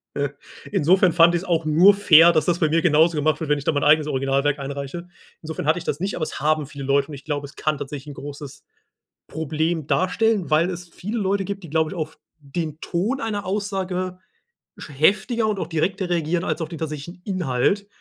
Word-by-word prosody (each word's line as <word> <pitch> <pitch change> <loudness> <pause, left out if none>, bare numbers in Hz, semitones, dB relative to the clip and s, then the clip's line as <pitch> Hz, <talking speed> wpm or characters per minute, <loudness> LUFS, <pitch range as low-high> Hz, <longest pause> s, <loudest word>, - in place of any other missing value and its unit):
Äh, 140 0 -1 0.4
insofern 180 +4 +4
fand 170 +1 +5
ich's 175 +1 -1
auch 165 -3 0
nur 175 +6 +6
fair, 170 -4 +7
dass 155 -2 +1
das 175 -1 +1
bei 160 - +2
mir 165 +2 +1
genauso 160 0 +4
gemacht 155 +1 +1
wird, 160 -3 -4
wenn 150 - +3
ich 140 - -6
da - - +1
mein 145 -2 -1
eigenes 150 +1 +5
Originalwerk 140 0 0
einreiche. 140 +5 -6 0.3
Insofern 160 -2 -5
hatte 155 +4 +2
ich - - -11
das 145 - -2
nicht, 195 +2 -2
aber - - -6
es 155 - -3
haben 155 0 +1
viele 140 -1 -8
Leute 140 +1 +2
und 150 - -8
ich 135 - -12
glaube, 145 -2 -3
es 140 - -17
kann 155 -2 -1
tatsächlich 145 0 -7
'n - - -7
großes 145 0 -9 0.7
Problem 160 0 -2
darstellen, 190 +3 +1
weil 160 +4 +3
es 175 -1 -7
viele 210 +7 -5
Leute 195 0 0
gibt, 200 0 -5
die 170 - -10
glaube 160 0 +1
ich, - - -7
auf 155 -1 -5 0.2
den 155 +1 -5
Ton 210 +11 -2
einer 215 -5 -3
Aussage, 185 -2 -3 0.6
sch - - -9
heftiger 215 - +2
und 210 -2 -1
auch 165 - -3
direkter 180 +4 -1
reagieren 170 +1 0
als 170 - -2
auf 155 - -5
den 165 - -7
tatsächlichen 160 +3 -6
Inhalt. 185 +1 0
160 Hz, 215 wpm, -22 LUFS, 150-185 Hz, 0.7 s, fair